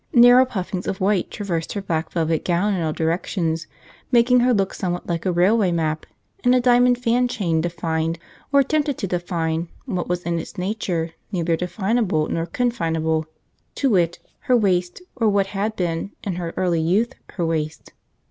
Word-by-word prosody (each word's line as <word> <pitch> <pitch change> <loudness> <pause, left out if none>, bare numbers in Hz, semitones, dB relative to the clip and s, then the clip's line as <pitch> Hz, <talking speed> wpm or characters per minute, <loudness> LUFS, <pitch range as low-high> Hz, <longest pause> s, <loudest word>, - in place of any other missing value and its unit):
Narrow 245 +1 +8
puffings 190 -6 -4
of 195 - -2
white 195 -1 +1
traversed 175 -6 -3
her 200 - -3
black 165 -4 -2
velvet 165 -2 0
gown 185 +4 +1
in 185 - -1
all 160 -1 0
directions, 165 0 -1 0.4
making 245 +1 +5
her 250 +1 +3
look 195 -4 +1
somewhat 175 -1 -3
like 170 +1 -2
a - - +2
railway 185 +3 +3
map, 155 -2 -1 0.4
and 245 +1 +5
a - - +5
diamond 245 0 +4
fan 245 0 +2
chain 170 -9 0
defined, 165 -1 -1 0.3
or 280 -1 +6
attempted 290 0 0
to - - -2
define, 170 -2 -2 0.2
what 185 -9 -3
was 180 0 -2
in 170 -1 -1
its - - -8
nature 180 -4 -2 0.2
neither 170 -3 +1
definable 180 -1 0
nor 165 0 -1
confinable, 165 -9 0 0.5
to 270 -3 +1
wit, 175 -4 +2 0.2
her 255 -3 +3
waist, 185 - 0
or 225 -3 +2
what 200 -1 +2
had 210 +2 -1
been, 170 -1 -2
in 195 -4 -2 0.2
early 175 -3 +1
youth, 205 +10 +1 0.2
her 175 - -1
waist. 155 -1 -3
180 Hz, 170 wpm, -22 LUFS, 165-225 Hz, 0.5 s, Narrow